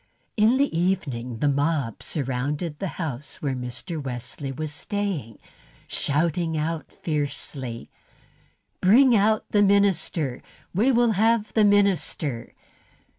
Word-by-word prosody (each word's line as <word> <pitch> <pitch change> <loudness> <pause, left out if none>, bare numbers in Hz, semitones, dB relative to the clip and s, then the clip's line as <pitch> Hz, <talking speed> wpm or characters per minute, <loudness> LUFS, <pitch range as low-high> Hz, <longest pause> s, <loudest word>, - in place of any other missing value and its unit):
In 220 +4 +4
the 280 -9 +1
evening 145 -10 -1
the 145 - +1
mob 140 -4 0
surrounded 145 +3 -3
the 195 - -2
house 150 -5 -5
where 140 -3 -1
Mr. 125 +5 -5
Wesley 135 +1 -5
was 150 +2 -4
staying, 180 - -3 0.5
shouting 160 +2 0
out 155 +1 -3
fiercely: 140 -5 -4 0.9
"Bring 240 +6 +6
out 215 +1 +3
the 205 - +4
minister! 195 -9 +2 0.3
We 220 +9 +3
will 240 -2 +4
have 220 +1 +2
the 215 -2 +4
minister!" 190 - +1
160 Hz, 115 wpm, -25 LUFS, 135-200 Hz, 0.9 s, Bring